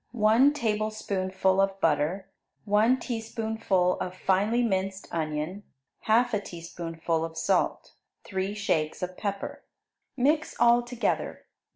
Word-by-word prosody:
1 230 +5 +5
tablespoonful 210 -6 0
of 195 0 0
butter. 165 +4 +1 0.4
1 220 +5 +3
teaspoonful 220 -6 -1
of 180 0 -4
finely 205 +6 +2
minced 195 -3 -1
onion. 155 +4 -3 0.5
1/2 220 -1 +3
teaspoonful 165 -1 -4
of 165 0 -6
salt. - - 0 0.3
3 190 0 -3
shakes 160 -6 -1
of 180 0 -4
pepper. 200 -1 -4 0.5
Mix 300 +4 +1
all 240 0 +6
together. 240 0 -2
200 Hz, 105 wpm, -27 LUFS, 180-225 Hz, 0.5 s, all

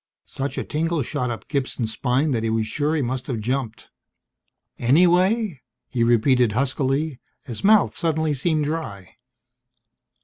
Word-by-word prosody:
Such 135 +1 -5
a - - -1
tingle 160 0 -1
shot 125 +1 -2
up 115 - -6
Gibson's 130 -5 -2
spine 130 +6 0
that 115 -4 0
he 115 - -1
was 110 0 0
sure 150 +7 -1
he 150 - 0
must 125 +1 -3
have 125 -5 -2
jumped. 115 0 -3 0.9
"Anyway?" 180 - +3 0.3
he 120 -2 0
repeated 120 0 +3
huskily. 135 +2 -1 0.2
His 120 -6 -7
mouth 210 0 +4
suddenly 160 -2 0
seemed 150 +2 0
dry. 115 - -5
135 Hz, 140 wpm, -23 LUFS, 120-155 Hz, 0.9 s, mouth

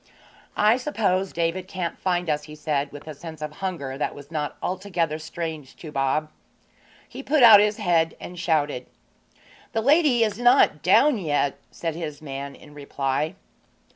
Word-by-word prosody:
'I 215 +3 +4
suppose 200 -9 0
David 170 +2 -2
can't 180 -3 -4
find 180 -2 -1
us,' 150 -1 -1
he 150 0 -10
said, 145 -2 -2
with 145 +2 -11
a 155 - -6
sense 160 +2 -10
of 150 0 -6
hunger 140 -8 -4
that - - -2
was 145 +1 -12
not 150 -2 -3
altogether 180 -4 -2
strange 160 -3 -6
to 155 - -10
Bob. 150 +2 0 0.8
He - - -8
put 280 0 +2
out 220 -3 +10
his 210 0 +2
head 170 -5 +1
and 180 -1 -8
shouted. 150 -7 0 0.9
'The 225 - +1
lady 280 -2 +4
is 215 0 -1
not 245 - +4
down 240 - +4
yet,' 145 -5 0
said 165 -2 -4
his 155 -3 -6
man 140 -1 -6
in 150 - -16
reply. 145 +3 -2
165 Hz, 165 wpm, -24 LUFS, 150-195 Hz, 0.9 s, out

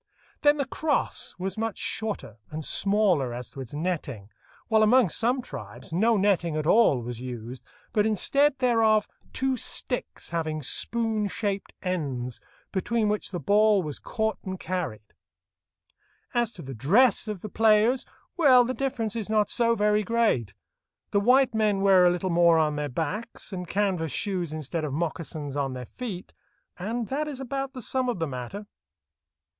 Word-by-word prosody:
Then 290 0 +5
the 280 - 0
crosse 295 +2 -1
was 190 +3 -4
much 225 -2 -2
shorter, 210 - -3
and 155 0 -5
smaller 190 - +2
as 125 0 -7
to 135 - -8
its 125 - -9
netting, 145 - -3 0.4
while 220 -1 +3
among 230 -1 +5
some 245 +7 0
tribes 190 - -9
no 220 +6 +3
netting 180 -5 +1
at 155 - -2
all 155 - +4
was 120 0 -6
used, 125 0 -7 0.3
but 210 0 +3
instead 275 +7 +2
thereof 225 -4 +3 0.2
two 265 0 0
sticks 250 -3 -2
having 155 -2 -2
spoon 220 - 0
shaped 200 -1 -3
ends, 135 - -3 0.3
between 215 +3 0
which 210 0 -1
the 180 - -4
ball 205 +4 +4
was 150 -3 -5
caught 220 -2 -2
and 185 -1 -5
carried. 165 - -3 1.3
As 240 -2 +1
to 170 - -9
the 135 0 -7
dress 200 - +3
of 210 -4 -4
the 215 - -6
players—well, 245 - +3
the 255 - -2
difference 245 -6 -2
is 220 -3 -3
not 215 -1 +2
so 235 -1 +3
very 210 0 +2
great. 210 - +1 0.6
The 200 - +3
white 255 +4 +4
men 210 -3 +1
wear 190 -2 +6
a - - +6
little 180 +1 -1
more 170 -1 +5
on 155 -2 +2
their 150 0 -2
backs, 190 - -4
and 180 -1 -5
canvas 185 -5 0
shoes 180 - -2
instead 155 +1 -4
of 145 -3 -3
moccasins 155 -2 -4
on 140 -2 -1
their 125 -1 -6
feet, 200 - -7 0.5
and 225 +5 -3
that 300 +3 -1
is 280 -3 -5
about 270 +1 -4
the 255 - -7
sum 255 +2 0
of 240 - -1
the 165 - -1
matter. 140 - -6
200 Hz, 165 wpm, -26 LUFS, 155-230 Hz, 1.3 s, wear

